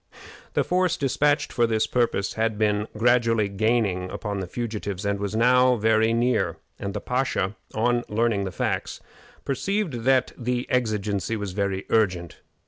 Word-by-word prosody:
The -, -, +3 dB
force 180 Hz, -1 st, +1 dB
dispatched 145 Hz, +2 st, +1 dB
for 120 Hz, -1 st, +2 dB
this 110 Hz, -1 st, +1 dB
purpose 115 Hz, -6 st, 0 dB
had 110 Hz, -1 st, -1 dB
been 105 Hz, 0 st, +1 dB
gradually 115 Hz, -2 st, +3 dB
gaining 100 Hz, -3 st, 0 dB
upon 100 Hz, -1 st, -4 dB
the 95 Hz, -, -4 dB
fugitives, 105 Hz, -3 st, -4 dB
and 100 Hz, 0 st, 0 dB
was 100 Hz, +1 st, -3 dB
now 125 Hz, +2 st, +4 dB
very 110 Hz, 0 st, +3 dB
near, 115 Hz, -7 st, +1 dB, 0.2 s
and 100 Hz, 0 st, -4 dB
the -, -, -1 dB
pasha, 125 Hz, -6 st, -1 dB, 0.2 s
on 120 Hz, +2 st, +1 dB
learning 105 Hz, -2 st, +1 dB
the 95 Hz, -, -4 dB
facts, -, -, -2 dB, 0.5 s
perceived 145 Hz, -, -1 dB
that 130 Hz, -1 st, +3 dB
the 125 Hz, 0 st, -2 dB
exigency 110 Hz, -3 st, 0 dB
was 105 Hz, -2 st, -4 dB
very 100 Hz, 0 st, -2 dB
urgent. 90 Hz, -6 st, 0 dB
110 Hz, 150 wpm, -25 LUFS, 100-125 Hz, 0.5 s, now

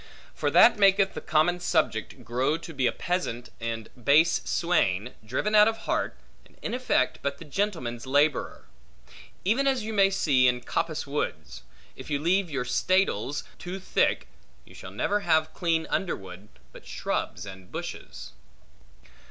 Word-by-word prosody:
For -, -, -1 dB
that -, -, +6 dB
maketh 195 Hz, -1 st, +4 dB
the -, -, -6 dB
common 175 Hz, +2 st, +2 dB
subject, 160 Hz, -11 st, -1 dB
grow 130 Hz, +6 st, 0 dB
to 165 Hz, 0 st, -10 dB
be 130 Hz, -3 st, +1 dB
a -, -, +2 dB
peasant 170 Hz, -9 st, -3 dB
and 115 Hz, -1 st, -4 dB, 0.2 s
base 160 Hz, +5 st, +4 dB
swain, 125 Hz, -, 0 dB
driven 130 Hz, -, -2 dB
out 210 Hz, 0 st, +7 dB
of 225 Hz, 0 st, -3 dB
heart, -, -, -1 dB, 0.3 s
and -, -, -24 dB
in -, -, -3 dB
effect 130 Hz, -, +1 dB
but 140 Hz, 0 st, -2 dB
the 165 Hz, -, -11 dB
gentleman's 150 Hz, -, -3 dB
laborer. 145 Hz, +2 st, +1 dB, 0.8 s
Even 250 Hz, +8 st, +2 dB
as 265 Hz, -4 st, +1 dB
you 220 Hz, +1 st, -4 dB
may 195 Hz, -2 st, +5 dB
see 140 Hz, -9 st, +3 dB
in 125 Hz, 0 st, +1 dB
coppice 155 Hz, +5 st, -2 dB
woods; 80 Hz, -, -4 dB, 0.3 s
if -, -, -10 dB
you 145 Hz, -, +1 dB
leave 175 Hz, +5 st, +1 dB
your 135 Hz, -4 st, -2 dB
staddles 145 Hz, -, +1 dB, 0.2 s
too 180 Hz, +2 st, -6 dB
thick, 65 Hz, -, 0 dB, 0.4 s
you -, -, -17 dB
shall -, -, -10 dB
never 155 Hz, -, 0 dB
have 160 Hz, -4 st, +1 dB
clean 165 Hz, -2 st, 0 dB
underwood, 95 Hz, -, -4 dB, 0.2 s
but -, -, -14 dB
shrubs 90 Hz, -, -3 dB
and 95 Hz, -2 st, -11 dB
bushes. -, -, -7 dB
155 Hz, 155 wpm, -27 LUFS, 120-190 Hz, 0.8 s, out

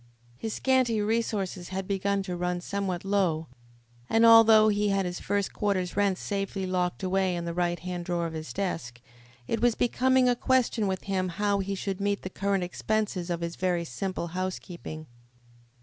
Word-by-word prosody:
His 220 Hz, -, -4 dB
scanty 255 Hz, -4 st, +2 dB
resources 205 Hz, -4 st, -1 dB
had 190 Hz, 0 st, -4 dB
begun 200 Hz, 0 st, 0 dB
to 180 Hz, -2 st, -4 dB
run 180 Hz, 0 st, -1 dB
somewhat 190 Hz, -1 st, -3 dB
low, 185 Hz, -5 st, +1 dB, 0.6 s
and, 225 Hz, +1 st, +4 dB
although 225 Hz, -1 st, +8 dB
he 210 Hz, 0 st, +1 dB
had 195 Hz, -1 st, +1 dB
his 175 Hz, 0 st, -4 dB
first 200 Hz, -1 st, -1 dB
quarter's 190 Hz, -4 st, -1 dB
rent 200 Hz, -2 st, +2 dB
safely 195 Hz, -1 st, -3 dB
locked 180 Hz, 0 st, -1 dB
away 185 Hz, -1 st, +1 dB
in 170 Hz, 0 st, -3 dB
the 170 Hz, -, -3 dB
right 175 Hz, 0 st, 0 dB
hand 180 Hz, -1 st, -5 dB
drawer 175 Hz, -1 st, -1 dB
of 165 Hz, -, -4 dB
his 160 Hz, 0 st, -6 dB
desk, 165 Hz, -11 st, -3 dB, 0.5 s
it 225 Hz, -, -2 dB
was 240 Hz, -2 st, +3 dB
becoming 255 Hz, +1 st, +3 dB
a 245 Hz, -, +3 dB
question 245 Hz, -4 st, +1 dB
with 190 Hz, -1 st, -2 dB
him 185 Hz, -2 st, -1 dB
how 200 Hz, +3 st, 0 dB
he 195 Hz, +1 st, -2 dB
should 195 Hz, 0 st, -4 dB
meet 200 Hz, 0 st, 0 dB
the 185 Hz, -, -5 dB
current 195 Hz, -1 st, 0 dB
expenses 190 Hz, 0 st, -2 dB
of 170 Hz, -1 st, -2 dB
his 170 Hz, 0 st, -3 dB
very 180 Hz, -2 st, 0 dB
simple 170 Hz, +5 st, -4 dB
housekeeping. 175 Hz, -3 st, -5 dB
190 Hz, 180 wpm, -28 LUFS, 180-205 Hz, 0.6 s, although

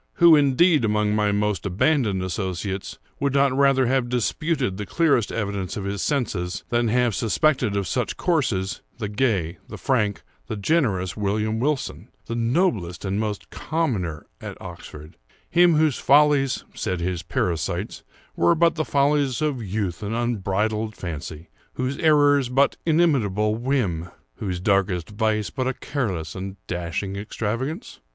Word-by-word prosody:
Who, 170 Hz, -4 st, +7 dB
indeed, 150 Hz, +2 st, +4 dB
among 105 Hz, -1 st, +1 dB
my 105 Hz, -1 st, +2 dB
most 105 Hz, -2 st, 0 dB
abandoned 100 Hz, -, +1 dB
associates, 95 Hz, 0 st, -4 dB, 0.2 s
would 140 Hz, -1 st, 0 dB
not 140 Hz, -1 st, +3 dB
rather 135 Hz, -1 st, +4 dB
have 125 Hz, 0 st, +1 dB
disputed 125 Hz, -, -1 dB
the 105 Hz, -, -4 dB
clearest 145 Hz, -10 st, +2 dB
evidence 100 Hz, -4 st, -3 dB
of 100 Hz, -, -4 dB
his 100 Hz, +1 st, -3 dB
senses, 100 Hz, -, -1 dB
than 120 Hz, 0 st, +1 dB
have 120 Hz, 0 st, +2 dB
suspected 120 Hz, -1 st, +1 dB
of 100 Hz, -2 st, -1 dB
such -, -, -2 dB
courses, 115 Hz, -, 0 dB, 0.2 s
the 110 Hz, -, -3 dB
gay, 100 Hz, -7 st, 0 dB
the -, -, -8 dB
frank, 110 Hz, -7 st, 0 dB, 0.2 s
the 110 Hz, -, -3 dB
generous 100 Hz, -, 0 dB
William 105 Hz, +2 st, -1 dB
Wilson—the 135 Hz, -3 st, -3 dB
noblest 115 Hz, -, 0 dB
and 95 Hz, +1 st, -1 dB
most 105 Hz, -2 st, -2 dB
liberal -, -, -11 dB
commoner 110 Hz, -, -1 dB, 0.2 s
at -, -, -7 dB
Oxford—him 80 Hz, -, -1 dB
whose 155 Hz, -3 st, +2 dB
follies 140 Hz, -1 st, +4 dB
(said 90 Hz, -, -2 dB
his 90 Hz, 0 st, -2 dB
parasites) 85 Hz, +2 st, -2 dB, 0.3 s
were 170 Hz, -, +3 dB
but 170 Hz, 0 st, +4 dB
the 160 Hz, 0 st, -1 dB
follies 140 Hz, -2 st, +2 dB
of 150 Hz, -5 st, -1 dB
youth 100 Hz, -3 st, -3 dB
and 105 Hz, +2 st, -3 dB
unbridled 110 Hz, -1 st, -1 dB
fancy—whose 85 Hz, -, -6 dB
errors 145 Hz, -4 st, +4 dB
but 135 Hz, +2 st, +3 dB
inimitable 120 Hz, -, +2 dB
whim—whose 95 Hz, -, -3 dB
darkest 95 Hz, -2 st, +1 dB
vice 110 Hz, 0 st, 0 dB
but 130 Hz, -2 st, -2 dB
a 130 Hz, -, -1 dB
careless 95 Hz, -, -3 dB
and 95 Hz, 0 st, -6 dB
dashing 90 Hz, +3 st, -3 dB
extravagance? 115 Hz, -, -4 dB
110 Hz, 140 wpm, -23 LUFS, 95-140 Hz, 0.3 s, Who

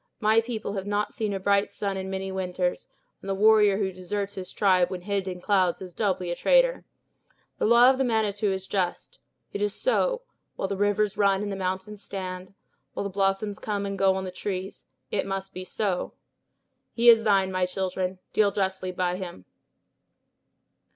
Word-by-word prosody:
My 220 Hz, 0 st, +4 dB
people 225 Hz, -3 st, -4 dB
have 195 Hz, -1 st, -4 dB
not 205 Hz, 0 st, -1 dB
seen 215 Hz, -2 st, -2 dB
a 195 Hz, -, -2 dB
bright 200 Hz, +1 st, +2 dB
sun 200 Hz, -1 st, -3 dB
in 190 Hz, 0 st, -4 dB
many 190 Hz, 0 st, -3 dB
winters; 180 Hz, -1 st, -2 dB, 0.3 s
and 195 Hz, -, -8 dB
the 195 Hz, -, 0 dB
warrior 210 Hz, -1 st, +5 dB
who 195 Hz, -2 st, -1 dB
deserts 195 Hz, +2 st, -4 dB
his 185 Hz, -2 st, -7 dB
tribe 185 Hz, -3 st, +3 dB
when 185 Hz, -1 st, -5 dB
hid 195 Hz, 0 st, -2 dB
in 180 Hz, -1 st, -4 dB
clouds 185 Hz, -4 st, +2 dB
is 185 Hz, -2 st, -9 dB
doubly 185 Hz, -4 st, -1 dB
a -, -, -1 dB
traitor. -, -, +3 dB, 0.7 s
The -, -, +2 dB
law 235 Hz, +2 st, +7 dB
of 265 Hz, -, -2 dB
the -, -, +3 dB
Manitou 215 Hz, -4 st, +1 dB
is 190 Hz, 0 st, -3 dB
just. 185 Hz, -3 st, -3 dB, 0.3 s
It 200 Hz, -, -3 dB
is 205 Hz, -1 st, 0 dB
so; -, -, +1 dB, 0.3 s
while -, -, -2 dB
the 200 Hz, -, -2 dB
rivers 205 Hz, +1 st, +1 dB
run 200 Hz, -1 st, +3 dB
and 205 Hz, -, -3 dB
the -, -, -3 dB
mountains 190 Hz, +2 st, -4 dB
stand, 185 Hz, -1 st, -6 dB, 0.4 s
while -, -, -2 dB
the 200 Hz, -, -4 dB
blossoms 195 Hz, +1 st, 0 dB
come 205 Hz, -2 st, -2 dB
and 200 Hz, 0 st, -3 dB
go 195 Hz, 0 st, +3 dB
on 190 Hz, -, -2 dB
the 185 Hz, -, -5 dB
trees, 190 Hz, +1 st, -5 dB, 0.3 s
it -, -, 0 dB
must 195 Hz, 0 st, -4 dB
be 185 Hz, -, -6 dB
so. 185 Hz, -1 st, -2 dB, 0.8 s
He 235 Hz, 0 st, +2 dB
is 225 Hz, -1 st, +8 dB
thine, 195 Hz, -3 st, +3 dB
my 185 Hz, -1 st, +1 dB
children; 185 Hz, 0 st, -2 dB, 0.2 s
deal 210 Hz, -2 st, +4 dB
justly 190 Hz, -2 st, -1 dB
by 180 Hz, 0 st, -1 dB
him." 175 Hz, -, -8 dB
195 Hz, 190 wpm, -26 LUFS, 185-210 Hz, 0.8 s, is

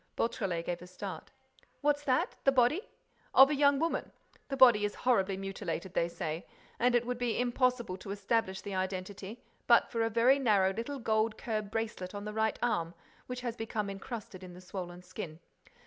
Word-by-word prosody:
Beautrelet 185 Hz, -7 st, -1 dB
gave 175 Hz, -1 st, -3 dB
a 180 Hz, -, -10 dB
start: 180 Hz, -, -7 dB, 0.5 s
"What's 290 Hz, 0 st, +2 dB
that? 255 Hz, -3 st, +1 dB
The 275 Hz, -, +5 dB
body—" 270 Hz, -, +3 dB, 0.5 s
"Of 270 Hz, +2 st, +9 dB
a -, -, +2 dB
young 280 Hz, 0 st, +4 dB
woman.—The 295 Hz, -2 st, -4 dB
body 240 Hz, -5 st, +7 dB
is 205 Hz, -, -1 dB
horribly 195 Hz, -6 st, +3 dB
mutilated, 190 Hz, -2 st, -4 dB
they 170 Hz, -, +1 dB
say, 165 Hz, -1 st, -4 dB, 0.3 s
and 245 Hz, +1 st, +3 dB
it 240 Hz, 0 st, +2 dB
would 250 Hz, 0 st, -3 dB
be 240 Hz, -2 st, 0 dB
impossible 245 Hz, -5 st, +1 dB
to 195 Hz, -, -10 dB
establish 200 Hz, -1 st, 0 dB
the 200 Hz, -, -6 dB
identity, 190 Hz, +3 st, -4 dB, 0.2 s
but 235 Hz, -1 st, +5 dB
for 230 Hz, -, 0 dB
a 225 Hz, -, +2 dB
very 240 Hz, +5 st, +4 dB
narrow 200 Hz, -7 st, +3 dB
little 235 Hz, +7 st, -4 dB
gold 220 Hz, -2 st, +1 dB
curb 215 Hz, -4 st, -3 dB
bracelet 215 Hz, -4 st, -3 dB
on 205 Hz, 0 st, -5 dB
the 210 Hz, -, -5 dB
right 220 Hz, 0 st, +1 dB
arm 170 Hz, -8 st, 0 dB, 0.3 s
which 250 Hz, 0 st, -5 dB
has 240 Hz, -2 st, -3 dB
become 215 Hz, -3 st, -3 dB
encrusted 195 Hz, -2 st, -7 dB
in 180 Hz, -1 st, -10 dB
the -, -, -11 dB
swollen 180 Hz, -1 st, -7 dB
skin. 180 Hz, -3 st, -7 dB
215 Hz, 180 wpm, -32 LUFS, 190-245 Hz, 0.5 s, Of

